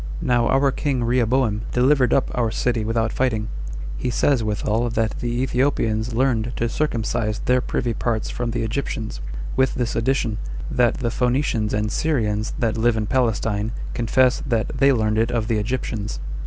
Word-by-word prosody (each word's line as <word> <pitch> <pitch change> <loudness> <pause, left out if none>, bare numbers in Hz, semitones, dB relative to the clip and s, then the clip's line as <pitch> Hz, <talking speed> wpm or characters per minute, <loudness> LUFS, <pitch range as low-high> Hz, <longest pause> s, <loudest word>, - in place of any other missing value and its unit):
Now 120 -1 +2
our 135 +1 +3
king 135 -2 -1
Rehoboam 120 -2 +2
delivered 125 0 +3
up 135 - +2
our 120 -2 +1
city 115 0 0
without 110 0 0
fighting. 110 -5 0 0.5
He 125 - -2
says 125 0 +2
withal 105 +1 0
27 120 -1 -1
that 110 -1 0
the 120 +1 -1
Ethiopians 120 -4 0
learned 120 -2 +1
to 115 - 0
circumcise 115 -5 -1
their 125 0 +3
privy 120 -1 -1
parts 115 -1 -1
from 120 -1 -3
the 115 0 -2
Egyptians, 110 - -3 0.3
with 130 0 +2
this 120 -2 -1
addition, 115 -2 0 0.3
that 120 -1 +3
the 120 -4 -2
Phoenicians 125 -3 0
and 105 0 0
Syrians 110 -10 0
that 115 -2 0
live 115 0 +3
in 110 - 0
Palestine 115 -3 0 0.2
confess 125 +2 +2
that 115 -2 0
they 135 +1 +4
learned 110 -3 +1
it 115 - +2
of 115 -3 -1
the 115 -2 +1
Egyptians. 110 -2 -3
120 Hz, 170 wpm, -22 LUFS, 110-125 Hz, 0.5 s, they